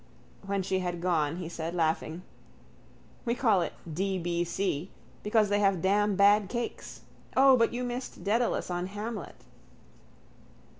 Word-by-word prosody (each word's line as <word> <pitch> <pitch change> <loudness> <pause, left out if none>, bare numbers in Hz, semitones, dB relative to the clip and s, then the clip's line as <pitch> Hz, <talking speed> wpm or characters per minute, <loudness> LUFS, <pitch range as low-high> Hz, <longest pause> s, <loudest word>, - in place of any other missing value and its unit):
When 195 0 -1
she 190 +1 0
had 175 -1 -3
gone 165 -4 +1
he 180 -2 -5
said, 165 0 -5
laughing: 160 +1 -1 1.0
—We 235 -1 0
call 220 -8 +3
it 165 - -3 0.2
D.B.C. 175 -1 -1 0.3
because 210 0 +2
they 205 0 +2
have 195 -4 +2
damn 205 +1 +2
bad 200 0 +5
cakes. 240 -1 -5 0.4
O, 265 0 +7
but 230 -2 +3
you 245 +1 -3
missed 245 +1 -5
Dedalus 225 -2 0
on 175 +1 -2
_Hamlet. 210 +3 -6
195 Hz, 135 wpm, -29 LUFS, 175-215 Hz, 1.0 s, O